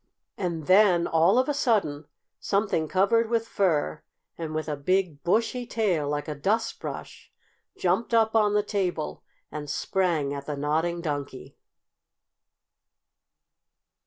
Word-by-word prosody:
And 170 -5 -3
then, 185 -2 +5
all 165 +7 +3
of 255 - +3
a 295 - +1
sudden, 200 - 0 0.3
something 200 -6 0
covered 220 +6 +2
with 230 -1 0
fur 160 -8 0 0.3
and 160 -2 -5
with 155 -1 -2
a 150 - -2
big, 170 0 0
bushy 230 +6 0
tail, 180 -12 0
like 145 +1 -2
a 150 - -3
dustbrush, 195 +10 -3 0.5
jumped 185 +7 0
up 225 -1 +3
on 210 -2 +3
the 210 - +3
table 185 -7 -2 0.3
and 150 -1 -6
sprang 165 -4 0
at 140 -1 -7
the 150 -1 -3
Nodding 160 +4 0
Donkey. 145 -5 -5
175 Hz, 130 wpm, -26 LUFS, 150-210 Hz, 0.5 s, then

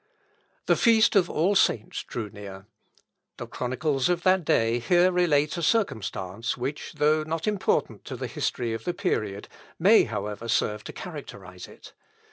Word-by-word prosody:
The - - +3
feast 225 -1 +4
of 185 -3 +4
All 175 +6 +1
Saints 115 - +1
drew 110 -4 -6
near. 100 -2 -10 0.7
The - - -6
chronicles 135 +3 -1
of 175 -1 0
that 185 -1 +3
day 115 -4 +2
here 175 +8 +3
relate 160 -3 +2
a - - -3
circumstance, 110 - -1
which, 135 +4 -5
though 155 +1 +2
not 160 +1 -3
important 210 -3 -1
to - - -6
the - - -5
history 120 -2 -2
of 115 0 -5
the 175 - -2
period, 105 - -2 0.3
may, - - +5
however, 105 +3 -5
serve 105 -2 0
to - - -6
characterise 100 - -9
it. - - -15
145 Hz, 155 wpm, -26 LUFS, 110-175 Hz, 0.7 s, may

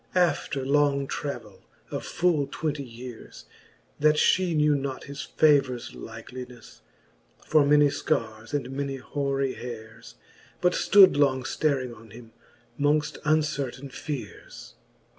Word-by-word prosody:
After 150 -6 +1
long 140 0 +2
travell 140 +1 -6 0.3
of - - -4
full 160 -5 +1
twenty 150 -2 -3
yeares, 120 -1 -11 0.5
That 150 +1 +4
{he 185 -3 +3
knew 150 0 +4
not 135 -2 -3
his 140 0 -7
favours 140 -5 +2
likelyncfTej 120 - -10 0.7
For 155 -1 +4
many 150 +1 +5
fearres 110 -7 -2
and 135 -3 -2
many 140 0 -3
hoary 135 0 -2
heares, 115 -1 -9 0.4
But 180 0 +2
ftood 195 -5 +6
long 130 -3 +2
ftaring 130 -3 -1
on 115 0 -16
him, 115 +2 -13 0.5
mongft 150 +1 +1
uncertaine 140 -4 0
feares. 145 +1 -7
140 Hz, 120 wpm, -26 LUFS, 125-150 Hz, 0.7 s, ftood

